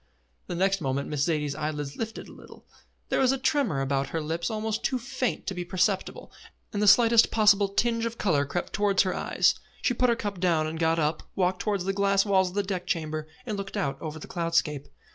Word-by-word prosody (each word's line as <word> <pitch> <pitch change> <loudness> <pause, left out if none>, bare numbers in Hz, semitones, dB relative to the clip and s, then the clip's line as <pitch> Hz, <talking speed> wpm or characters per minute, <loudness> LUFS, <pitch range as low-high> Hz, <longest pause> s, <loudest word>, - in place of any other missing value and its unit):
The 175 - -4
next 195 +1 +1
moment 135 0 -2
Miss 150 -2 -2
Zaidie's 150 -4 0
eyelids 150 -1 -4
lifted 225 0 -5
a - - -13
little. - - -15 0.4
There - - +1
was 260 -1 +4
a 270 - 0
tremor 260 - +1
about 135 0 0
her 165 - -2
lips 165 +2 -2
almost 220 0 -2
too 260 - +1
faint 255 0 -3
to 195 - -2
be 180 -1 -4
perceptible, 180 +1 -1 0.4
and 205 - -1
the 210 - +2
slightest 230 +1 +6
possible 210 -2 +4
tinge 230 +3 0
of 230 0 -7
colour 155 -8 +2
crept 175 +5 -3
upwards - - -6
towards 205 -2 +3
her 185 - -1
eyes. - - +2 0.3
She 250 - +2
put 250 +1 +2
her 235 - +3
cup 205 -4 -4
down 170 -4 +2
and 160 +1 -4
got 165 0 +2
up, 155 0 0
walked 185 -1 +1
towards 200 -4 -1
the 195 - 0
glass 195 0 +2
walls 190 -2 +3
of 180 - -12
the 205 - +1
deck 185 -2 -4
chamber, 155 -3 -2 0.2
and 215 -4 -3
looked 195 0 -5
out 135 -1 -2
over 155 -1 -5
the 155 - -9
cloud 170 -1 -3
scape. 145 -4 +1
185 Hz, 230 wpm, -27 LUFS, 155-210 Hz, 0.4 s, slightest